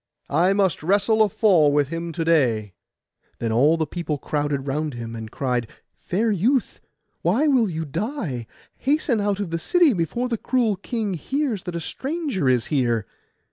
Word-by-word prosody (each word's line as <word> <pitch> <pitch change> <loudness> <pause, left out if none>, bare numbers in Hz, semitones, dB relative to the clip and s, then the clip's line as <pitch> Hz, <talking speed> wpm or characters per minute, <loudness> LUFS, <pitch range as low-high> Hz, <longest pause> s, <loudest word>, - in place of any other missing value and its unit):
I 175 +6 +3
must 195 -4 +1
wrestle 205 +6 +2
a 215 - +5
fall 180 -8 +4
with 145 -1 +2
him 165 +1 -4
to 165 -1 -2
day.' 120 - +2 0.6
Then 115 -1 -2
all 145 +8 +4
the 160 - 0
people 160 -1 -3
crowded 145 -1 -2
round 150 0 -2
him, 115 -1 -6
and 110 -1 -7
cried, 125 -2 -1 0.3
'Fair 220 +5 -1
youth, 220 +5 0 0.4
why 215 - +2
will 250 -7 +3
you 160 -1 -3
die? 145 - -4 0.3
Hasten 275 -5 +1
out 205 -1 0
of 200 -5 -3
the 165 - -1
city, 335 - +4
before 190 +8 -1
the 230 -3 -2
cruel 240 -5 +1
king 210 +1 -3
hears 255 - -2
that 180 -2 -4
a - - -1
stranger 270 - -2
is 125 -2 +2
here. 120 -6 +1
170 Hz, 175 wpm, -23 LUFS, 145-220 Hz, 0.6 s, a